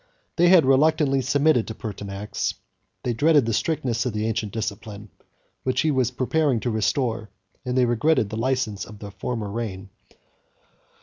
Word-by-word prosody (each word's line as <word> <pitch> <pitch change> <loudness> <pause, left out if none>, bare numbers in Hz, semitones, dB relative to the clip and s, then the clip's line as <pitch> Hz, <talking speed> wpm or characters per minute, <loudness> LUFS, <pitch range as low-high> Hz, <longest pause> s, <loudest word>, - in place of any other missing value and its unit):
They 175 +1 +4
had 180 -5 +7
reluctantly 140 0 +3
submitted 140 -1 +2
to 110 - -6
Pertinax; 100 -1 -4 0.5
they 120 - 0
dreaded 145 +2 +4
the 115 - -1
strictness 125 -4 0
of 125 - -2
the 105 0 -1
ancient 110 -2 -2
discipline, 105 -1 -5 0.5
which 130 -1 0
he 155 - +2
was 130 -4 +1
preparing 130 +1 +1
to 120 - -1
restore; 110 +1 -1 0.4
and 125 0 -1
they 125 - +4
regretted 120 -1 +1
the - - -4
license 115 -5 -1
of 105 - -12
the 100 0 -9
former 110 -1 -4
reign. 100 -4 -5
120 Hz, 160 wpm, -24 LUFS, 105-135 Hz, 0.5 s, had